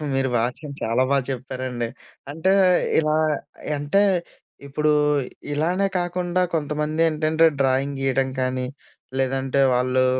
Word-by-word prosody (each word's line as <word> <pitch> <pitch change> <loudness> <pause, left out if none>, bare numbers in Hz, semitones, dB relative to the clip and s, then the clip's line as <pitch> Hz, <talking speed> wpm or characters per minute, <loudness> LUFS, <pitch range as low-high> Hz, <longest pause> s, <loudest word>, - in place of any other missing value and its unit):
మీరు 135 -1 +1
మాత్రం 125 +5 -3
చాలా 115 +3 +1
బాగా 140 -2 +2
చేప్పారండి. 130 -2 -4 0.4
అంటే, 165 +6 +1 0.5
ఇలా 155 -1 +1 0.5
య్ - - 0
అంటే, 145 +8 +2 0.7
ఇప్పుడూ 150 +2 +1 0.6
ఇలానే 175 +7 +1
కాకుండా 175 0 -1
కొంతమందేంటంటే, 155 +1 +1 0.2
డ్రాయింగ్ 135 +1 +1
గీయడం 135 0 +1
కానీ, 130 0 -1 0.5
లేదంటే 135 +1 +1
వాళ్ళు 130 +1 +2
140 Hz, 105 wpm, -23 LUFS, 130-155 Hz, 0.7 s, బాగా